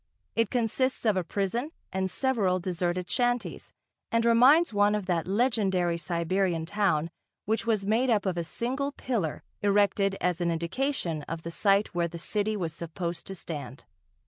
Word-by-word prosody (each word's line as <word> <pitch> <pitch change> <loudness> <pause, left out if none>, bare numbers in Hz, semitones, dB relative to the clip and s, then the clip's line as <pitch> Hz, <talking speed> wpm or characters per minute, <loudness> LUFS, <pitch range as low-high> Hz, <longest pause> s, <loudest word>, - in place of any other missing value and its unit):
It 230 -2 +2
consists 250 +2 0
of 215 -3 +3
a 185 - 0
prison 205 - -2 0.2
and 190 0 0
several 205 -7 +1
deserted 175 0 -2
shanties, 245 +2 -1 0.4
and 230 0 +2
reminds 255 +6 +6
one 205 +1 +3
of 210 -2 -2
that 175 -3 -1
legendary 195 -5 +1
Siberian 170 +1 0
town, 170 -5 0 0.3
which 220 +2 -1
was 215 -4 +1
made 230 +5 +2
up 210 -4 +2
of 185 -2 0
a 170 - -1
single 265 - -2
pillar 215 - -2 0.2
erected 200 -1 +2
as 180 -1 0
an 170 - +1
indication 170 - -1
of 165 0 -5
the 170 - -5
site 200 +3 +2
where 170 -1 +1
the 170 0 -8
city 210 +5 0
was 170 -5 -3
supposed 170 +1 -5
to 195 - -6
stand. 150 -6 -7
195 Hz, 165 wpm, -28 LUFS, 170-230 Hz, 0.4 s, reminds